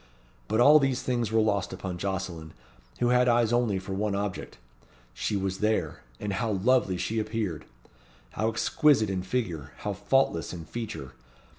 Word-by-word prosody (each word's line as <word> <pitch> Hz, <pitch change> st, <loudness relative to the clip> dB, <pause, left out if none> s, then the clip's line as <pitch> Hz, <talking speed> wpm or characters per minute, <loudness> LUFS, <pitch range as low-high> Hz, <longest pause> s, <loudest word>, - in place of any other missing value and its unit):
But 110 Hz, +2 st, 0 dB
all 145 Hz, +5 st, +8 dB
these 135 Hz, -3 st, 0 dB
things 120 Hz, -3 st, -1 dB
were 110 Hz, -, +3 dB
lost 100 Hz, -3 st, 0 dB
upon 90 Hz, -2 st, -5 dB
Jocelyn, 90 Hz, -5 st, -4 dB, 0.5 s
who 120 Hz, -, +2 dB
had 125 Hz, 0 st, +4 dB
eyes 120 Hz, -1 st, +3 dB
only 120 Hz, -5 st, +2 dB
for 95 Hz, +1 st, -5 dB
one 100 Hz, +1 st, -1 dB
object. 100 Hz, -1 st, -4 dB, 0.6 s
She 80 Hz, -, -1 dB
was 95 Hz, -1 st, -2 dB
there, 105 Hz, -8 st, 0 dB, 0.2 s
and 105 Hz, -1 st, -3 dB
how 110 Hz, +1 st, -1 dB
lovely 100 Hz, -1 st, +2 dB
she 110 Hz, +5 st, -1 dB
appeared! 105 Hz, -7 st, -3 dB, 0.7 s
How 110 Hz, -, 0 dB
exquisite 110 Hz, 0 st, +3 dB
in 95 Hz, -1 st, -1 dB
figure 90 Hz, -, -3 dB
how 105 Hz, -, -3 dB
faultless 100 Hz, -5 st, +1 dB
in 85 Hz, -2 st, -7 dB
feature! 110 Hz, -, -6 dB
105 Hz, 160 wpm, -28 LUFS, 95-120 Hz, 0.7 s, all